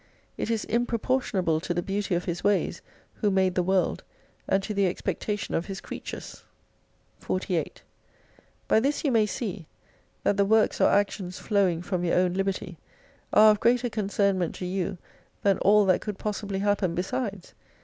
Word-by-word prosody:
It - - -3
is 225 -2 -1
improportionable 230 -7 0
to 175 0 -3
the 175 - -1
beauty 195 -1 -1
of 175 - -2
His 175 -1 -3
ways, 205 -1 +1 0.4
Who 210 - +1
made 190 -1 +2
the 180 - +1
world, 185 +1 +1 0.4
and 195 0 +2
to 210 - -3
the 200 -1 +2
expectation 205 +3 -3
of 165 - -1
His 195 -1 -5
creatures. - - -8 0.8
48 - - -2 0.8
By - - +4
this 280 +5 0
you 285 - +2
may 220 -3 +3
see, 195 -5 -4 0.6
that 205 - +2
the 200 - +4
works 220 +2 +2
or - - +6
actions 195 -2 0
flowing 190 -5 +1
from 180 -1 -2
your 175 - +1
own 180 -1 +2
liberty 190 -2 -3 0.5
are 215 0 +7
of 210 - 0
greater 245 +1 +2
concern 200 -2 +1
ment 175 -3 -2
to 180 - -5
you 185 0 -2 0.5
than 200 -2 +3
all 205 +1 +5
that 185 -1 +3
could 210 -3 -5
possibly 205 -2 -3
happen 200 -3 +1
besides. 195 +1 -3
195 Hz, 170 wpm, -27 LUFS, 185-210 Hz, 0.8 s, are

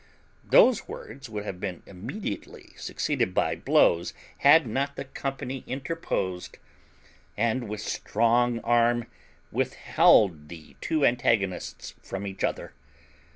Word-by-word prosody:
Those - - +5
words 130 +2 -9
would 105 -1 -5
have 95 -3 -5
been 95 -3 -5
immediately 105 - -7
succeeded 90 - -2
by - - +1
blows 85 +1 +2 0.2
had 150 +2 +6
not 135 +5 -2
the - - -5
company 135 -1 -5
interposed, 130 - -3 0.8
and 115 +1 0
with 105 0 -4
strong 115 +2 +1
arm 120 0 +2 0.5
withheld 80 -8 +3
the 80 -5 -12
two 155 -3 +1
antagonists 110 -6 0
from 95 +1 -6
each 95 -1 -6
other. - - -2
115 Hz, 110 wpm, -27 LUFS, 95-130 Hz, 0.8 s, had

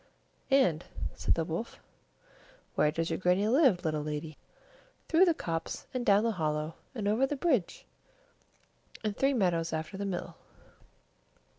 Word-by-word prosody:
"And," 220 - +3 0.3
said - - +1
the 165 - -1
wolf, 170 +8 -4 1.0
"where 150 - +3
does 165 +2 -2
your - - 0
good - - -12
Grannie 185 +3 +3
live, 235 - +4
little 155 -1 0
lady?" 150 +1 -4 0.7
"Through 335 +4 +5
the 340 -3 +3
copse, 165 - -4
and 255 -1 -1
down 205 -1 +4
the 230 - +2
hollow, 155 -4 -2 0.2
and 210 -4 -2
over 225 +6 +3
the 290 - -2
bridge, 265 - 0 1.2
and 210 -2 -1
three 275 +2 +2
meadows 170 -6 +1
after 160 +4 -4
the 200 - -3
mill." 185 -3 -4
185 Hz, 150 wpm, -30 LUFS, 165-240 Hz, 1.2 s, Through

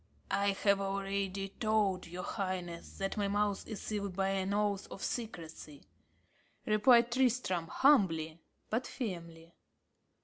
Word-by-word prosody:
"I 200 0 +2
have 200 -1 +4
already 195 0 -2
told 210 -5 +1
your 180 +2 -6
highness 185 -5 -4
that 195 +1 -2
my 205 -1 +1
mouth 205 0 0
is 215 -3 -6
sealed 200 -3 -3
by 195 0 +1
an 195 0 0
oath 205 -1 0
of - - -8
secrecy," 165 - -5 0.8
replied 235 +2 +5
Tristram, 240 -9 +1
humbly, 170 - +3 0.3
but 230 +3 0
firmly. 170 -7 -6
195 Hz, 125 wpm, -33 LUFS, 180-215 Hz, 0.8 s, replied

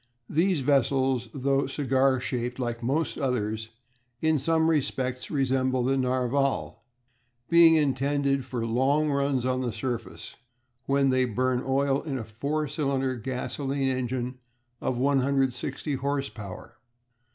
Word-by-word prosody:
These 170 0 +2
vessels, 130 -2 +2
though 135 +1 0
cigar 135 -1 +2
shaped 125 -1 -3
liked 120 -2 -3
most 140 +7 -1
others, 110 -5 -1 0.5
in 160 0 +2
some 160 +3 +2
respects 130 -5 -1
resemble 130 -2 +1
the 135 +2 +2
Narval, 130 +1 0 0.7
being 170 -1 +7
intended 140 -1 +1
for 120 -2 -3
long 135 +6 +2
runs 140 -2 0
on 130 0 0
the 125 -2 -1
surface, 120 0 -5 0.5
when 140 -1 +3
they 130 0 +3
burn 125 +2 0
oil 135 +1 +1
in 145 -4 -4
a 120 - -4
four 140 +8 -2
cylinder 135 -3 -1
gasolene 135 +3 -2
engine 125 0 -3 0.4
of 125 - -1
160 135 +1 0
horse 140 +1 -1
power. 100 -4 -10
135 Hz, 125 wpm, -27 LUFS, 125-140 Hz, 0.7 s, being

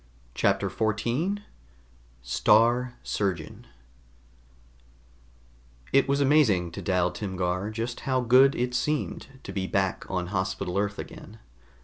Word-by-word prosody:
CHAPTER - - +1
14 120 - -1 0.8
STAR 120 - +3
SURGEON 95 -6 -3 2.3
It 135 - +4
was 140 0 +2
amazing 130 - +3
to - - -7
Dal 90 -2 +1
Timgar 95 -1 -2
just 115 +2 -4
how 130 -1 0
good 130 +3 +5
it 125 0 -1
seemed 150 +3 -1 0.2
to 95 - -7
be 95 -1 -2
back 95 -1 -1
on 90 -1 -2
Hospital 95 -1 -1
Earth 105 0 -1
again. 110 - -9
105 Hz, 110 wpm, -27 LUFS, 95-125 Hz, 2.3 s, good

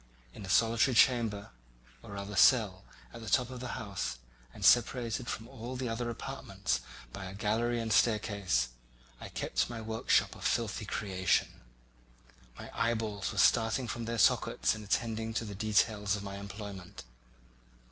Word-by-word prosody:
In - - -9
a 95 - -7
solitary 115 +5 +3
chamber, 115 -5 +3 0.5
or 100 - -10
rather 100 +1 -6
cell, 100 -3 +4 0.3
at 115 - -9
the 110 - -6
top 125 +3 +2
of 125 - -7
the 125 -1 -5
house, 95 - -4 0.3
and - - -5
separated 120 0 +3
from 115 - -4
all 125 -1 -7
the 125 0 -3
other 120 +1 -2
apartments 115 - -3 0.3
by 95 - -6
a 95 +1 -7
gallery 115 +3 0
and 110 -1 -1
staircase, 100 - +2 0.5
I - - -8
kept - - -1
my 120 -1 -5
workshop 110 0 +1
of - - -11
filthy - - 0
creation; 95 -3 0 1.0
my - - -9
eyeballs 110 -4 -1
were 105 - -8
starting 115 +5 +3
from 115 +1 -4
their 115 +1 -3
sockets - - +3
in 110 -1 -7
attending 110 +1 -1
to 115 - -1
the 105 - -6
details 105 0 +1
of 100 - -6
my 100 0 -6
employment. 100 -1 -8
110 Hz, 155 wpm, -31 LUFS, 100-115 Hz, 1.0 s, cell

